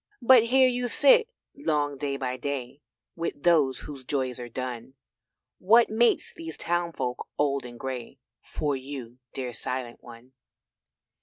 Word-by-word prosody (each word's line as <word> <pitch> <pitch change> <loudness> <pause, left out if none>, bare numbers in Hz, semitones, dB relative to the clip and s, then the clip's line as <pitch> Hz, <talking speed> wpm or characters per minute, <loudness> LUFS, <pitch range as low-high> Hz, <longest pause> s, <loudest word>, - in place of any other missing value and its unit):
But 240 -2 +7
here 260 +2 +5
you 245 0 -1
sit 480 - +5 0.3
long 150 - 0
day 140 0 -3
by 130 -2 -3
day 140 0 -5 0.3
With 165 -4 -4
those 150 -7 +3
whose 140 -3 -9
joys 130 -2 -2
are 120 0 -7
done; 125 +1 -6 0.6
What 225 +4 +5
mates 235 +2 +2
these 165 -1 -8
townfolk 170 -7 -2
old 140 -2 0
and 120 -1 -10
grey 130 0 -6 0.2
For 145 -2 -2
you 130 -2 -8 0.2
dear 125 -2 -4
Silent 120 +2 -5
one. 120 +2 -14
140 Hz, 140 wpm, -27 LUFS, 125-175 Hz, 0.6 s, But